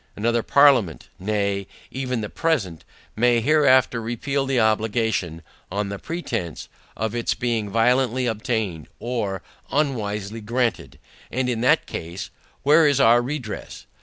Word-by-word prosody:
Another 115 +2 +1
parliament, 130 - +3
nay, 100 0 -1 0.2
even 130 -3 -2
the 105 - -4
present, 105 - -1 0.3
may 120 +1 +3
hereafter 130 -2 +3
repeal 135 +5 -2
the 135 -2 +1
obligation, 110 -6 0 0.3
on 100 +1 -2
the 100 0 -5
pretence, 115 - -4 0.3
of 110 0 -2
its 120 -1 -1
being 115 -4 -1
violently 125 +3 +2
obtained, 110 - -2
or 105 -6 -3 0.3
unwisely 110 -7 -1
granted; 120 +2 -2 0.3
and 130 0 -1
in 120 -2 -1
that 125 - +3
case, 85 +4 -6 0.3
Where 150 +3 +6
is 140 -2 +2
our 120 -1 +6
redress? 125 -4 -6
115 Hz, 130 wpm, -23 LUFS, 105-130 Hz, 0.3 s, Where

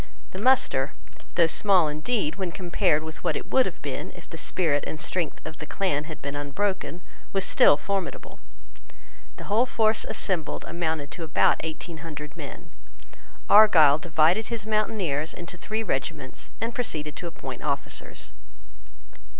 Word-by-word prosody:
The 185 - -6
muster, 210 - +3 0.4
though 170 - +6
small 180 0 +4
indeed 155 +2 -1
when 190 -3 -2
compared 170 -4 +1
with 160 0 -8
what - - +1
it - - -5
would 260 -1 +5
have - - -7
been - - -4
if - - -12
the - - -9
spirit 150 -6 0
and 155 - -5
strength 170 0 -2
of 160 0 -7
the 155 - -7
clan 150 -6 0
had 155 -1 -9
been 140 0 -3
unbroken, 180 +5 -2 0.3
was 195 -1 +1
still 145 - +6
formidable. 195 +2 -4 1.0
The - - -9
whole 225 +5 +2
force 220 -2 +2
assembled 175 -6 -2
amounted 160 -4 -2
to 165 +2 -5
about 155 - +3
eighteen 160 +1 -5
hundred 150 -1 -8
men. - - -9 0.8
Argyle 165 -9 +7
divided 165 +6 +2
his 230 -3 -3
mountaineers 205 -9 0
into 175 0 -7
three 215 +5 -3
regiments, 135 -5 -4
and 230 +2 -2
proceeded 155 - -3
to 175 - -5
appoint 130 -6 -7
officers. 140 -2 -2
165 Hz, 150 wpm, -26 LUFS, 150-200 Hz, 1.0 s, Argyle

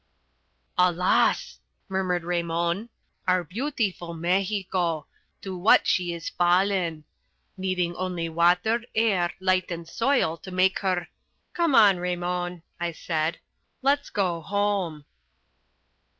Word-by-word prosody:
"Alas!" 180 - +2 0.3
murmured 185 -2 -1
Raymon. 170 +4 -1 0.4
"Our 185 -1 +3
beautiful 195 - -3
Mexico. 180 -2 0 0.4
To 190 -1 -5
what 180 +5 +5
is - - -6
she 175 -2 0 0.2
fallen! 175 -2 +2 0.5
Needing 185 -2 -1
only 180 -2 -3
water, 180 +8 +2
air, 195 -6 +2
light 185 0 +1
and 170 -1 -5
soil 230 - +1
to 190 - -11
make 185 +1 +2
her 185 -3 -1 0.2
" - - -47
"Come 335 -5 +2
on, 205 -4 +7
Raymon," 175 -1 -3 0.2
I 170 -1 -2
said, 160 0 -2 0.5
"let's 285 +1 +2
go 180 -4 -1
home." 195 -5 -1
180 Hz, 110 wpm, -26 LUFS, 170-195 Hz, 0.5 s, on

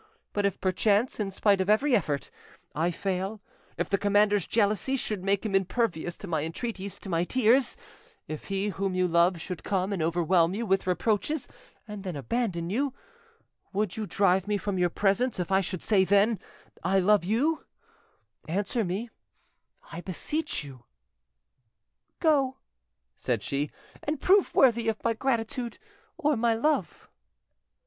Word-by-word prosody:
But 205 -1 +2
if 200 - -4
perchance, 205 +6 +1
in 205 -2 -1
spite 195 0 +2
of 190 - -1
every 250 +5 +4
effort, 150 -9 -1 0.4
I 165 +3 +1
fail, 190 +3 -3 0.4
if - - -1
the 195 - 0
commander's 205 -1 +3
jealousy 215 +4 +1
should 210 -6 -3
make 200 +1 +1
him 210 - -2
impervious 190 -3 0
to 200 - -8
my 160 -4 0
entreaties—to 195 +3 -5
my 170 -2 +1
tears, 250 +4 +3 0.5
if 155 -1 -6
he 195 +1 -1
whom 195 -1 -2
you 185 0 +2
love 170 +1 +3
should 180 +1 -6
come 195 0 0
and 185 - -2
overwhelm 170 +2 +2
you 230 +2 -2
with 195 -2 +1
reproaches 215 - 0 0.4
and 210 -2 -7
then 185 -4 -4
abandon 170 - -2
you, 270 +4 0 0.8
would 200 -1 -1
you 215 -1 -4
drive 190 -1 +2
me 210 -1 +1
from 200 -1 -2
your 175 -1 +3
presence 205 +5 +1
if 180 +1 -2
I 190 0 +4
should 185 -2 -4
then 200 +2 +3
say, - - -24 0.4
'I 190 +3 +2
love 205 0 +4
you'? 260 - +1 0.8
Answer 205 +7 -1
me, 205 +6 -3 0.8
I 165 +1 -6
beseech 290 - -3
you." 130 -4 -11 1.4
"Go!" 280 -5 +2 0.6
said - - -2
she, 140 +1 -2 0.3
"and 300 0 -2
prove 390 +5 +3
worthy 235 -3 +4
of 220 - -3
my 230 - +2
gratitude—or 270 - -2
my 230 0 +2
love." 300 +7 -1
200 Hz, 150 wpm, -28 LUFS, 180-230 Hz, 1.4 s, every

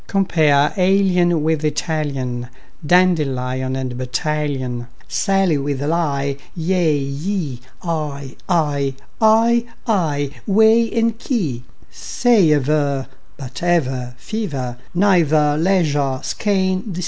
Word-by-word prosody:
Compare 155 -7 +2
alien 180 -3 +2
with 160 -1 0
Italian, 145 -6 -2 0.4
Dandelion 135 -7 +1
with 130 -2 -4
battalion, 130 -2 -2 0.2
Sally 195 -6 +1
with 140 -1 -2
ally; 145 -3 -1 0.2
yea, 170 -3 +1
ye, 140 0 -3 0.2
Eye, 150 -5 -4
I, 145 -6 0 0.3
ay, 230 +2 +4 0.2
aye, 150 -10 0 0.2
whey, 220 +3 +4
key, 225 - -1
quay! - - -17 0.3
Say 235 -9 +2
aver, 145 -1 +1 0.3
but 130 -3 -8
ever, 130 -8 0
fever, 135 - -4 0.2
Neither, 160 -6 +3
leisure, 145 -7 +1
skein, 190 -3 0
receiver. 185 -2 -6
155 Hz, 100 wpm, -19 LUFS, 135-185 Hz, 0.4 s, ay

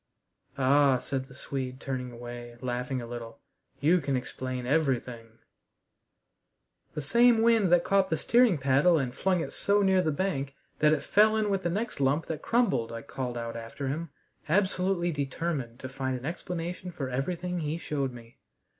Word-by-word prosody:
"Ah," 135 0 +4
said 130 +1 -3
the 135 -1 -15
Swede, 130 -1 -4
turning 130 -2 -4
away, 120 0 -8
laughing 125 +1 -2
a - - -6
little, 115 -1 -7 0.4
"you 165 +5 +4
can 140 -2 -1
explain 130 0 -4
everything!" 125 -5 -1 1.6
"The 150 - -3
same 235 - +5
wind 225 -6 +4
that 175 -1 +5
caught 195 -1 +2
the 160 - +1
steering 235 -4 +4
paddle 140 +5 +4
and 130 -4 -1
flung 185 +2 +1
it - - -5
so 205 0 +2
near 190 -1 +4
the 160 - 0
bank 140 -5 -2 0.2
that 150 0 +5
it 155 - +1
fell 215 +1 +4
in 210 -2 +1
with 195 -1 +1
the 175 - -1
next 210 +3 -3
lump 140 +4 +2
that 160 -2 -4
crumbled," 230 - +1
I 115 0 -6
called 125 -3 -4
out 115 0 -4
after 115 +4 -5
him, 160 +4 -3 0.4
absolutely 185 -1 +1
determined 140 -4 -3
to 130 - -5
find 130 -1 -3
an 125 - -9
explanation 175 +2 -4
for 140 -5 -4
everything 175 +7 -2
he 155 0 -2
showed 140 -5 -2
me. 120 -1 -14
140 Hz, 170 wpm, -28 LUFS, 125-180 Hz, 1.6 s, same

